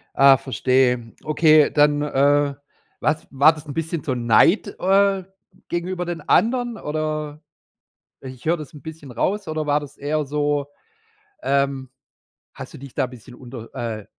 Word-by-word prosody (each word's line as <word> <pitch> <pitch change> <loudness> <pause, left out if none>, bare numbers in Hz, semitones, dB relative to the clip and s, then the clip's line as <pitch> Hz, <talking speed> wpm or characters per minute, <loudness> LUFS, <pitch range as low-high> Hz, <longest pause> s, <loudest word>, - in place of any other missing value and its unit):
Ah, 135 0 +7
verstehe. 125 -1 0
Okay, 155 -1 +4
dann, 145 0 +3
äh, 145 0 +2 0.5
was 155 - -1
war 140 +4 +5
das 155 0 -12
'n 145 - -6
bisschen 165 0 -3
so 130 - -1
Neid, 125 - +3
äh, 195 0 +2 0.4
gegenüber 180 +1 -3
den 175 -1 -5
anderen 240 +8 +1
oder 155 0 -4 0.8
i 130 - -7
ich 130 -1 -12
hör 165 +2 +2
das 150 -4 -9
'n 145 - -12
bisschen 160 -4 -10
raus, 190 - -2
oder 155 -1 -3
war 145 0 +2
das 145 0 -11
eher 150 +2 -2
so, 145 0 -1 0.8
ähm 140 - 0 0.7
hast - - -9
du - - -9
dich 135 -1 -11
da 135 - +1
bisschen 125 0 -13
unter 120 -2 -11
äh, 110 -3 -4
145 Hz, 155 wpm, -22 LUFS, 135-160 Hz, 0.8 s, Ah